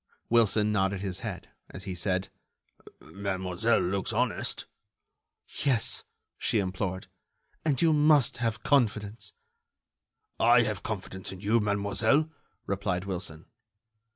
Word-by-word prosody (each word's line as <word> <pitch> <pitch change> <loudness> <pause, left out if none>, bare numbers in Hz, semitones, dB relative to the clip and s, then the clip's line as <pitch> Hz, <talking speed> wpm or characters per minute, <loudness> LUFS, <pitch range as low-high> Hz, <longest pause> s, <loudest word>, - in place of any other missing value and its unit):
Wilson 110 -2 +4
nodded 95 -2 +1
his 95 -3 -3
head, - - -6 0.2
as 95 - -8
he 95 - -4
said: 90 +1 -1 0.7
"Mademoiselle 95 +2 -1
looks 95 +3 -1
honest." 120 +1 -1 1.0
"Yes," 130 -6 +2 0.3
she - - +1
implored, 95 -1 -2 0.6
"and 145 -5 +1
you 160 -1 +5
must 145 -3 +4
have 115 -1 -2
confidence——" 110 -6 +1 1.1
"I 120 +1 +6
have 105 -4 -2
confidence 95 -3 -4
in 95 -1 -9
you, 110 +3 +3
mademoiselle," 105 +8 +1 0.3
replied 95 -2 -1
Wilson. 90 -4 -4
105 Hz, 110 wpm, -28 LUFS, 95-115 Hz, 1.1 s, I